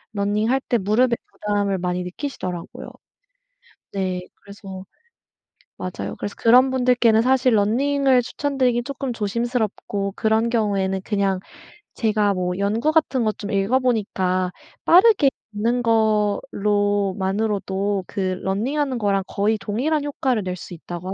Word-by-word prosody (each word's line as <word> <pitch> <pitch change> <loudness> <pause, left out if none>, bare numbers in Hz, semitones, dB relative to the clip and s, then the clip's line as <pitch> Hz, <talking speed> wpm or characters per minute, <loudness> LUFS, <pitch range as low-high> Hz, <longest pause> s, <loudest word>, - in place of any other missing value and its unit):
running할 210 +6 +1
때 240 - +3
무릎에 230 +4 +2 0.2
부담을 205 -2 -1
많이 180 0 -2
느끼시더라고요. 180 - -6 1.0
네. 185 -2 -2
그래서 195 -2 -10 0.9
맞아요. 185 - -5
그래서 205 - -5
그런 250 +3 +5
분들께는 245 -3 +3
사실 255 -1 +3
running을 260 +5 +2
추천드리긴 255 -2 0
쪼끔 275 -2 -4
조심스럽고 215 -2 -2
그런 220 +1 +1
경우에는 195 -4 0
그냥 200 -3 0 0.6
제가 215 -3 +1
뭐 180 -1 -2
연구 220 +9 +1
같은 285 -6 +2
거 215 - +2
좀 205 -1 -7
읽어 200 +6 +2
보니까 190 -7 0 0.3
빠르게 370 -4 +6 0.2
걷는 235 +4 0
거로만으로도 205 -2 0
그 190 -2 -2
running하는 255 +7 -1
거랑 200 -2 +1
거의 210 +2 0
"동일한 270 +10 -1
효과를 260 -6 -1
낼 180 -1 -3
수 180 - -10
있다."고 175 +2 -8
하 - - -3
210 Hz, 345 characters per minute, -22 LUFS, 195-250 Hz, 1.0 s, 빠르게